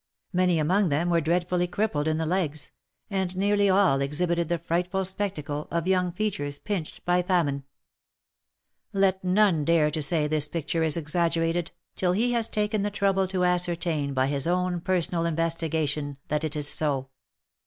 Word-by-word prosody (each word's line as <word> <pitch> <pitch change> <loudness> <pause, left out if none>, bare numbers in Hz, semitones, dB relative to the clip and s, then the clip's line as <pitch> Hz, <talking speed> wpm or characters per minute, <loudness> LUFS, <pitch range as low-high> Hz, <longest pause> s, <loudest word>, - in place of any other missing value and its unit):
Many 180 -1 +3
among 180 +5 +2
them 160 +5 +1
were 170 -1 +3
dreadfully 175 +2 0
crippled 175 -6 -1
in 155 0 +1
the 160 - -1
legs, 160 -4 -2 0.4
and 190 -2 -1
nearly 205 +1 +2
all 185 -8 +4
exhibited 170 +4 0
the 170 - +1
frightful 180 +3 -1
spectacle 170 -7 -3
of 170 +1 -2
young 180 -1 +2
features 170 -8 -2
pinched 185 -2 -5
by 180 0 +3
famine. 165 -7 0 1.3
Let 195 -1 +2
none 185 -4 +3
dare 155 -1 +3
to 155 +1 -2
say 155 0 +2
this 150 -1 +1
picture 165 +1 -2
is 160 0 +1
exaggerated, 165 +1 0 0.3
till 180 -1 +1
he 235 +6 +1
has 230 -2 0
taken 210 0 0
the 205 - 0
trouble 195 -1 +1
to 185 -1 0
ascertain 170 -5 0
by 130 0 +2
his 140 +1 0
own 180 0 0
personal 175 -2 0
investigation, 160 -3 -1
that 150 +1 0
it 155 -1 -1
is 150 -1 0
so. 140 -4 0
170 Hz, 165 wpm, -26 LUFS, 155-185 Hz, 1.3 s, all